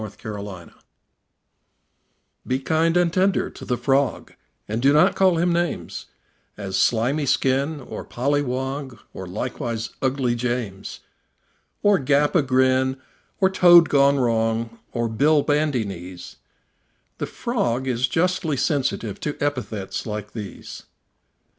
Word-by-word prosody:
The 110 - -5
Frog 100 -4 -8 1.8
Be 130 - +1
kind 160 +5 +1
and 175 -2 +2
tender 190 0 +1
to - - -12
the 125 - -1
Frog, 135 -1 0 0.3
And 110 +2 -2
do 140 +2 +4
not 150 - +5
call 185 -3 +3
him 175 +1 +2
names, 175 -1 -3 0.5
As 100 -2 -5
"Slimy 125 +8 +1
skin," 135 +4 +1
or 130 - -8
"Polly 140 +4 0
wog," 130 0 -4 0.2
Or 95 - -7
likewise 110 +4 -4
"Ugly 130 -2 0
James," 120 -5 -4 0.8
Or 205 -2 +4
"Gap 145 +2 +2
a 175 - +4
grin," 130 0 +2 0.4
or 190 -2 +3
"Toad 175 -3 +7
gone 140 0 +4
wrong," 115 -2 0
Or 120 -1 -1
"Bill 145 +7 +3
Bandy 145 -5 +1
knees": 90 -2 -9 0.8
The - - -2
Frog 130 - -2
is 125 0 +1
justly 165 0 0
sensitive 130 - -1
To 150 - -4
epithets 125 -10 -3
like 105 -1 -5
these. 105 -4 -8
130 Hz, 130 wpm, -23 LUFS, 115-150 Hz, 1.8 s, Toad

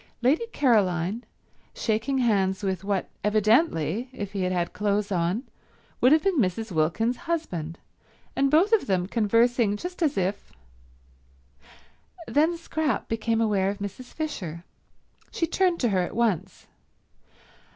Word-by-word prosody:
Lady 305 - +2
Caroline 210 - +1 0.5
shaking 230 +5 0
hands 200 -5 +1
with 190 -2 -2
what 200 -2 -1 0.2
evidently, 215 - +2
if 205 -6 -6
he 200 - -3
had 185 0 0
had 175 -1 -1
clothes 205 0 0
on, 180 +6 0 0.6
would 255 - +5
have 310 0 +5
been 385 -6 +2
Mrs. 220 +1 -1
Wilkins's 175 - 0
husband, 175 - -3 0.6
and 275 0 +2
both 335 +9 +4
of 440 - +3
them 185 -3 +1
conversing 230 +1 +2
just 360 +8 -7
as 300 -9 +1
if— 190 +2 -2 1.7
Then 320 +4 +2
Scrap 315 -7 -2
became 225 0 0
aware 200 -3 +2
of 200 - -3
Mrs. 200 +5 -6
Fisher. 180 - -5 0.7
She 330 - -1
turned 360 +1 +1
to 240 - +2
her 190 -3 +2
at 175 - -4
once. 195 -5 -1
215 Hz, 135 wpm, -26 LUFS, 190-270 Hz, 1.7 s, would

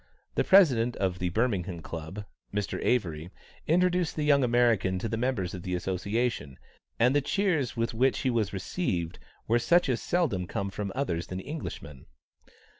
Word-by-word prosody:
The - - +1
President 125 - +5
of 95 -2 -1
the 90 - 0
Birmingham 95 -4 -1
Club, 85 +6 -6 0.3
Mr. 105 -1 -2
Avery, 85 -9 0 0.4
introduced 180 +1 +2
the 150 - -1
young 140 -2 +4
American 115 -6 +2
to 105 - -3
the 115 - -2
members 115 -7 -1
of 90 - -6
the 90 0 -2
association, 95 - -2 0.4
and 125 - +3
the 145 - +4
cheers 155 - 0
with 115 0 0
which 130 +4 +2
he 130 - +1
was 110 -4 0
received 90 - -3 0.3
were 115 +2 +3
such 175 +4 +3
as 125 - 0
seldom 125 - 0
come 100 +3 -3
from 100 0 -4
others 90 -12 -2
than 90 - -5
Englishmen. 95 - -7
115 Hz, 165 wpm, -28 LUFS, 90-130 Hz, 0.4 s, President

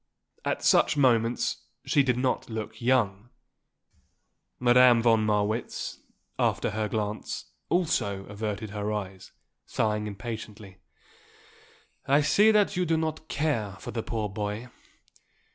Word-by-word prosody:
At - - -2
such - - +4
moments 120 -3 +2 0.3
she 145 - +3
did 125 -3 +1
not 130 -1 -1
look 110 0 -6
young. 120 -4 +1 1.3
Madame 125 -1 +6
von 115 -2 +3
Marwitz, 105 +2 -1 0.4
after - - +1
her 105 +1 -2
glance, 105 0 -4 0.2
also 150 - 0
averted 105 0 -5
her 105 0 -3
eyes, 95 -3 -5 0.4
sighing 105 -1 -1
impatiently. 105 -2 -8 1.3
"I 140 +2 +4
see 205 +9 +4
that 210 -2 +3
you 180 - +1
do 165 -2 +1
not 160 0 -3
care 140 -12 -1
for 95 - -8
the 115 - -3
poor 110 -2 -3
boy. 105 +4 -4
110 Hz, 120 wpm, -27 LUFS, 105-130 Hz, 1.3 s, Madame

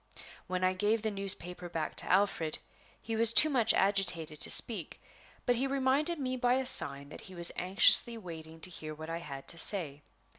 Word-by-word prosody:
When 185 0 -4
I 185 0 +1
gave 210 +4 -1
the 220 - -2
newspaper 180 -3 -3
back 160 -2 -5
to - - +2
Alfred 185 -5 0 0.4
he 225 - -6
was 225 0 +4
too 310 +6 +7
much 235 -5 +3
agitated 175 -6 -1
to - - +3
speak, 210 -9 +1 0.5
but 245 - +1
he 265 +3 -1
reminded 275 +5 0
me 255 -2 -4
by 245 0 +1
a 265 0 -2
sign 140 - +1
that - - -11
he 185 - -12
was 170 -1 +1
anxiously 195 +5 +4
waiting 160 -5 -11
to 185 - -2
hear 155 -2 -8
what 160 +1 -9
I 165 - -4
had 140 -5 -10
to 165 - +2
say. 155 -7 -3
185 Hz, 195 wpm, -30 LUFS, 165-230 Hz, 0.5 s, too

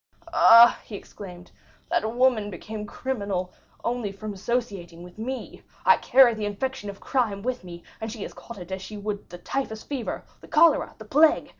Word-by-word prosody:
"Ah," 235 -6 +8
he 215 - -9
exclaimed, 180 -3 -11 0.4
"that 220 +1 +1
woman 245 -5 +3
became 210 +3 -7
criminal 200 -8 -3 0.3
only 235 -4 -2
from 210 +1 -7
associating 195 -5 -3
with 180 +4 -13
me! 255 +4 -5 0.2
I - - +7
carried 250 -4 +5
the 210 - -2
infection 205 +1 -4
of 200 - -8
crime 220 -7 -1
with 250 -3 -2
me, 175 -1 -10 0.2
and 220 0 -4
she 220 -3 -6
has - - -7
caught 235 - -11
it 180 0 -10
as 190 0 -4
she 210 +2 -8
would 205 0 -5
the 175 - -8
typhus 220 +3 -4
fever, 270 -5 -4 0.2
the - - -15
cholera, 320 0 +4
the 220 - -11
plague! 300 +8 +4
215 Hz, 180 wpm, -25 LUFS, 195-245 Hz, 0.4 s, Ah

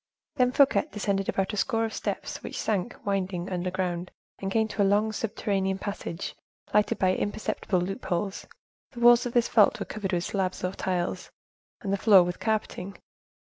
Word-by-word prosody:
Then 250 -1 +4
Fouquet 280 +2 +4
descended 200 -2 -1
about 195 +1 0
a - - -3
score 225 +2 +1
of 220 - -5
steps - - -4
which - - -6
sank, 215 +2 -1
winding, 190 -2 -2
underground, 180 -1 -2 0.3
and 195 - -3
came 220 +1 +2
to 205 - -2
a - - +6
long, 205 +2 +3
subterranean 195 -3 -1
passage, 195 -3 -5 0.4
lighted 210 0 +3
by 185 -1 +3
imperceptible 205 -2 -1
loopholes. 190 +1 -3 0.5
The 240 - -8
walls 240 +1 +6
of 240 - -6
this 240 -1 +3
vault 215 -3 +5
were - - -3
covered 205 -3 -4
with 175 -1 +1
slabs 185 -2 -2
or 180 - 0
tiles, 180 -2 -2 0.5
and 200 -4 -2
the - - +2
floor 195 -3 +7
with 175 0 -4
carpeting. 210 -3 -2
195 Hz, 175 wpm, -27 LUFS, 185-220 Hz, 0.5 s, floor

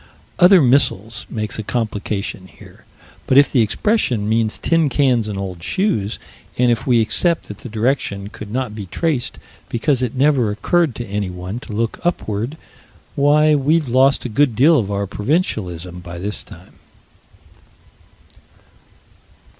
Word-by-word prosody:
"Other 180 -2 +7
missiles" 110 -5 +1
make 110 -1 -4
a - - 0
complication 105 -3 -3
here. 85 - -17 0.4
But 130 - +3
if 140 - +6
the 125 - +3
expression 120 - 0
means 110 0 +1
tin 165 -3 +1
cans 125 -5 +2
and 105 -2 -4
old 95 -3 -5
shoes, 110 - -1 0.4
and 125 -1 +3
if 115 +2 -2
we 120 -3 +4
accept 170 +9 +1
that 105 - -8
the 125 - -9
direction 110 -3 -1
could 105 -1 -9
not 125 -1 -3
be 105 -3 -7
traced 145 - -2 0.3
because 125 +3 0
it 125 0 -2
never 130 -4 +3
occurred 145 +6 +1
to 120 - -5
anyone 95 0 -4
to 115 - -9
look 115 +2 -2
upward 120 -5 -2 0.6
why, 150 +2 +4
we've 150 +2 +2
lost 130 +3 +3
a - - 0
good 125 +1 +2
deal 150 +6 +5
of 100 -4 -2
our 100 0 -1
provincialism 95 - -2
by 85 -1 -9
this 100 +4 -3
time. - - -15
115 Hz, 145 wpm, -19 LUFS, 105-140 Hz, 0.6 s, Other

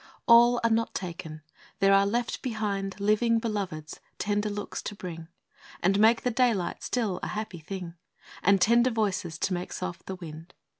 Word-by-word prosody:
A - - +4
LL 240 +1 +7
are 230 - +4
not 225 +1 0
taken! 165 -4 -6 0.3
there 195 0 +4
are 195 0 +5
left 235 +3 -1
behind 205 -5 -3
Living 215 +3 +3
Beloveds, 195 -9 -4 0.2
tender 205 0 0
looks 205 0 -5
to 205 - -6
bring, 165 -4 -7 0.6
And 195 +3 +3
make 225 +2 +5
the 250 - +1
daylight 225 -7 +1
still 215 -7 -1
a - - -3
happy 210 -5 -5
thing, 180 +1 -6 0.5
And 200 0 +4
tender 235 +6 +4
voices, 195 -8 -1
to 190 - -1
make 180 0 -4
soft 185 -2 -5
the 190 - -4
wind. 165 -1 -10
200 Hz, 170 wpm, -28 LUFS, 180-225 Hz, 0.6 s, LL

